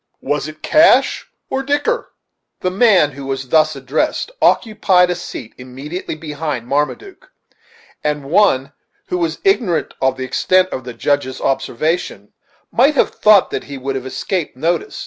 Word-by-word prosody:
Was 145 +1 -1
it 155 0 -11
cash 315 +3 +4 0.2
or 265 - 0
dicker?" 290 - -1 0.5
The 185 - 0
man 190 -7 +4
who 140 0 -9
was 135 -1 -4
thus 155 0 +3
addressed 135 - -2
occupied 190 -5 +3
a - - -1
seat 130 -9 -8
immediately 135 +8 -6
behind 150 -5 -4
Marmaduke, 380 - -3 0.7
and 150 -1 -1
one 140 -4 +2 0.4
who 180 - -1
was 165 -2 -1
ignorant 235 - +1
of 130 0 +1
the 130 - -4
extent 185 +8 +2
of 130 -7 -6
the 125 -2 -7
Judge's 135 +1 -1
observation 155 +6 -2 0.4
might 290 +2 +3
have - - +2
thought 210 -3 +4
he 140 -1 -7
would 135 +1 -3
have 130 -1 -4
escaped 165 +1 -3
notice. 170 - -1
155 Hz, 145 wpm, -18 LUFS, 135-190 Hz, 0.7 s, cash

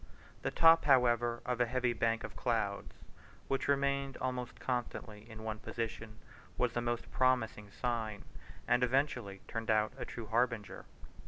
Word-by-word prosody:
The - - -1
top, 165 -1 +6
however, 120 -3 +4
of 125 -1 0
a 120 - +3
heavy 125 0 +1
bank 115 0 0
of - - -7
clouds, 110 -5 -1 0.5
which 135 - -1
remained 140 -1 +1
almost 125 -1 -3
constantly 115 -3 -4
in 110 -1 -9
one 110 -1 -4
position, 115 -1 -5 0.4
was 125 -2 +1
the 120 - 0
most 120 0 -2
promising 120 -5 +1
sign, 110 -2 -3 0.4
and 125 +1 +3
eventually 125 -6 0
turned 115 0 -4
out 110 0 +3
a - - -3
true 115 - -7
harbinger. 115 -1 -1
120 Hz, 150 wpm, -34 LUFS, 110-125 Hz, 0.5 s, top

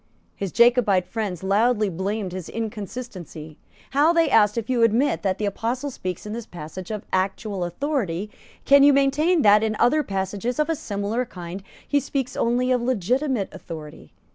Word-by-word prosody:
His 195 -3 -4
Jacobite 235 -6 +4
friends 195 -4 -4
loudly 215 +3 +2
blamed 190 +2 -3
his 185 -2 -6
inconsistency. 205 - -7 0.3
How, 290 +4 +4
they 330 -4 +2
asked, 210 -1 +4
if 230 -1 -2
you 250 -2 +1
admit 230 - +2
that 190 0 0
the 210 - -2
Apostle 240 +7 -2
speaks 185 -6 -5
in 210 - -5
this 230 0 -6
passage 170 +2 -8
of 215 -2 -5
actual 195 +1 -1
authority, 200 - -2 0.3
can 280 0 +7
you 285 0 +7
maintain 290 +4 +3
that, 210 0 +6
in 220 -1 0
other 305 +6 +3
passages 200 +1 -3
of 300 +2 +1
a - - 0
similar 215 -3 -2
kind, 180 -4 -8 0.3
he 285 - +2
speaks 270 -1 -3
only 245 +2 +1
of 250 -1 +2
legitimate 250 - 0
authority? 160 -5 -10
215 Hz, 165 wpm, -23 LUFS, 190-255 Hz, 0.3 s, can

